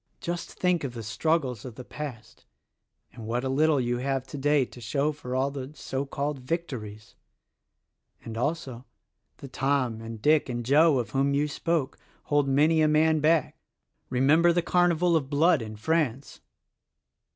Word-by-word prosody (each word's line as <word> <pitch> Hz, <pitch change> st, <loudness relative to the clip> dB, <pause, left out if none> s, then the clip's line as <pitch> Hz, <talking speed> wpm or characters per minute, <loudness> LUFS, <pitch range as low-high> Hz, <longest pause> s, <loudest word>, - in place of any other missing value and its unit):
Just 175 Hz, -1 st, -5 dB
think 180 Hz, -3 st, 0 dB
of 125 Hz, -3 st, -5 dB
the 115 Hz, -, -6 dB
struggles 130 Hz, 0 st, -1 dB
of 125 Hz, -4 st, -9 dB
the 125 Hz, -, -8 dB
past 120 Hz, -7 st, -9 dB, 0.7 s
and 110 Hz, -2 st, -9 dB
what 120 Hz, +2 st, -1 dB
a 130 Hz, -, -1 dB
little 150 Hz, +2 st, +3 dB
you 120 Hz, -1 st, -1 dB
have 135 Hz, 0 st, -2 dB
today 145 Hz, 0 st, +1 dB
to 125 Hz, -, -14 dB
show 140 Hz, +6 st, 0 dB
for 130 Hz, -4 st, -6 dB
all 135 Hz, +2 st, +1 dB
the 135 Hz, 0 st, -7 dB
so 135 Hz, -1 st, -4 dB
called 140 Hz, +1 st, -3 dB
victories! 125 Hz, -8 st, -5 dB, 1.1 s
And 115 Hz, -, -6 dB
also, 130 Hz, -1 st, -3 dB, 0.5 s
the 140 Hz, -, -9 dB
Tom 130 Hz, -4 st, -1 dB
and 115 Hz, 0 st, -7 dB
Dick 150 Hz, +4 st, +3 dB
and 120 Hz, -1 st, -3 dB
Joe 150 Hz, +3 st, +5 dB
of 115 Hz, -4 st, -3 dB
whom 140 Hz, +2 st, +1 dB
you 145 Hz, +1 st, +1 dB
spoke, 155 Hz, -1 st, -2 dB, 0.2 s
hold 145 Hz, -1 st, +1 dB
many 155 Hz, +4 st, +3 dB
a 155 Hz, -, +4 dB
man 155 Hz, +1 st, +3 dB
back. 155 Hz, 0 st, +1 dB, 0.5 s
Remember 150 Hz, +7 st, +4 dB
the 170 Hz, 0 st, +1 dB
carnival 175 Hz, -1 st, +2 dB
of 140 Hz, -4 st, 0 dB
blood 155 Hz, +1 st, +3 dB
in 110 Hz, -1 st, -7 dB
France!" 140 Hz, +2 st, -1 dB
140 Hz, 165 wpm, -27 LUFS, 125-155 Hz, 1.1 s, Joe